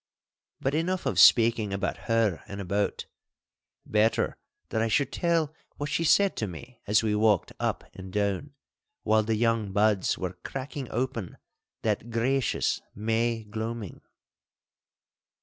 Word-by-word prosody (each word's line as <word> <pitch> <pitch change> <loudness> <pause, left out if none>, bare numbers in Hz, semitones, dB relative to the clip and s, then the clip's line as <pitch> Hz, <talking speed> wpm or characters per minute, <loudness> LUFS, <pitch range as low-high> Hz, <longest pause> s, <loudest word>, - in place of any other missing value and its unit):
But 135 - -1
enough 175 +3 -1
of 110 -10 +1
speaking 115 +1 +6
about 100 0 -3
her 115 -6 +2
and 100 - -7
about. 100 +1 -1 0.8
Better 110 +1 +2 0.3
that 110 - 0
I 115 - +2
should 135 +4 +1
tell 165 -3 +1 0.2
what 145 0 -4
she 165 - +1
said 200 +4 +4
to 110 - -1
me 120 +7 -10
as 105 +2 +4
we 110 -1 +1
walked 105 -3 +2
up - - -1
and 95 0 -9
down, 105 +8 -1 0.5
while 110 0 +4
the 110 +1 0
young 115 -2 +1
buds 105 -2 +2
were 90 -1 -3
cracking 135 0 -5
open 120 -6 -3 0.5
that 120 - -1
gracious 120 +2 0
May 115 +2 0
gloaming. 110 -1 -5
110 Hz, 135 wpm, -27 LUFS, 105-130 Hz, 0.8 s, speaking